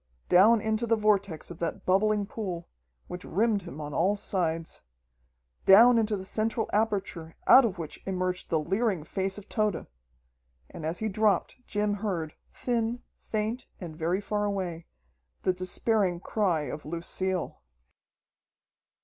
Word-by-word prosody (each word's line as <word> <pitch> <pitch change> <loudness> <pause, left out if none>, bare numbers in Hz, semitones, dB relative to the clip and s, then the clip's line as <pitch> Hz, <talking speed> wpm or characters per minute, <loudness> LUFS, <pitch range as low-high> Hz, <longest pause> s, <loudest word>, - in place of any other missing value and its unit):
Down 210 +5 +6
into 220 +2 -1
the 230 - +4
vortex 200 -6 0
of 170 - -10
that 170 -1 -3
bubbling 205 +2 +2
pool, 185 -5 -5 0.4
which 180 - -7
rimmed 210 +2 +1
him 170 -4 -9
on 145 -1 -6
all 190 +7 +2
sides... 165 -5 -2 0.8
down 230 +5 +8
into 215 -2 0
the 190 - -7
central 220 +3 -1
aperture 195 -6 -1
out 260 -1 +8
of 200 -4 -2
which 160 -3 -7
emerged 185 -1 -2
the 160 - +2
leering 190 +2 0
face 190 +4 -3
of 205 - -10
Tode! 215 -5 -1 0.9
And 155 - -5
as 165 +2 -2
he 220 - -2
dropped 215 0 +1
Jim 210 0 0
heard, 190 -7 -3 0.2
thin, 235 0 -2 0.2
faint, 220 +3 -3
and 170 -4 -7
very 170 +4 0
far 210 0 -1
away, 185 -5 -3 0.6
the 185 - +2
despairing 185 0 0
cry 185 -5 0
of 150 +1 -5
Lucille.... 170 +2 -3
195 Hz, 140 wpm, -28 LUFS, 170-215 Hz, 0.9 s, down